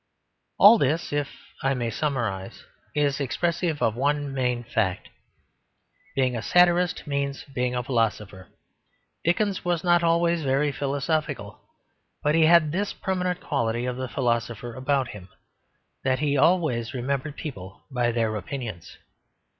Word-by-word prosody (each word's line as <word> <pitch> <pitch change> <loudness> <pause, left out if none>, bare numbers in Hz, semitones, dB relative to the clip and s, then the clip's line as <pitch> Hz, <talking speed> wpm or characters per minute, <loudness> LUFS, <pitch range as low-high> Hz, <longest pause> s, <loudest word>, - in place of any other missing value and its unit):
All 210 +3 +8
this 150 +3 0
(if 145 -1 0 0.3
I 135 0 +1
may 120 -2 -2
summarise) 110 -9 -3 0.3
is 145 -1 +1
expressive 165 +3 -1
of 110 - +2
one 145 +2 0
main 125 -2 0
fact. 105 -5 -1 1.1
Being 130 -2 +1
a 115 - -2
satirist 175 +3 +3
means 140 -2 -2
being 125 -2 -2
a 125 - -1
philosopher. 105 -6 -1 0.8
Dickens 195 +3 +1
was 175 -2 0
not 175 -1 +4
always 170 0 +2
very 140 +1 +1
philosophical; 140 -5 -2 0.6
but 150 - +2
he 165 0 +5
had 165 -2 +5
this 195 +5 -1
permanent 180 -1 -2
quality 115 +1 -1
of 125 -1 -2
the 130 0 -4
philosopher 120 -1 -1
about 130 0 0
him, 95 -4 -10 0.7
that 130 -1 +2
he 145 +1 0
always 145 -6 +2
remembered 140 +3 -2
people 100 - -8
by 120 -2 +1
their 115 -2 0
opinions. 105 - -6
135 Hz, 135 wpm, -25 LUFS, 120-160 Hz, 1.1 s, All